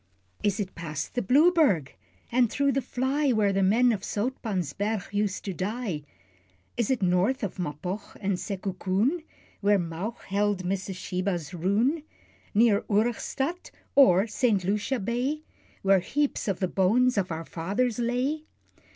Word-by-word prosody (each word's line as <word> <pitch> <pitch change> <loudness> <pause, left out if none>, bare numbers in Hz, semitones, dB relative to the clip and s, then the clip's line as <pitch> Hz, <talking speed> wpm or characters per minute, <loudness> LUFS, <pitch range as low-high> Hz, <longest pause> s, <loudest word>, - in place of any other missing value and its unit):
Is 205 +1 0
it 195 -2 -3
past 155 -3 -5
the 245 - 0
Blueberg, 280 - +4 0.4
and 240 -1 +3
through 280 +3 +1
the 275 +1 0
fly, 265 +4 0
Where 210 -4 +2
the 195 - +1
men 230 +6 +4
of 210 -4 -2
Zoutpansberg 205 - -2
used 205 -1 -1
to 195 - -2
die? 200 -3 -3 0.7
Is 235 -3 0
it 255 -6 +1
north 185 +9 +2
of 195 -1 -4
Mapog 180 +5 -3
or - - -15 0.2
Sekookoon, 195 - -1 0.4
Where 205 0 +4
Mauch 175 +6 -4
beheld 200 -1 0
Mrs. 190 +1 -2
Sheba's 180 -4 -3
"Roon?" 210 - +1 0.5
Near 215 -1 +5
Origstadt 240 - -1 0.2
or 195 -8 +6
St. 220 -3 +1
Lucia's 210 +5 -1
Bay, 255 +8 -1 0.4
Where 195 0 +5
heaps 285 +10 -1
of 195 -3 -1
the 185 - +2
bones 225 +8 +3
of 190 -3 0
our 165 +1 -4
fathers 205 +10 -1
lay? 255 +6 -1
205 Hz, 140 wpm, -27 LUFS, 185-250 Hz, 0.7 s, or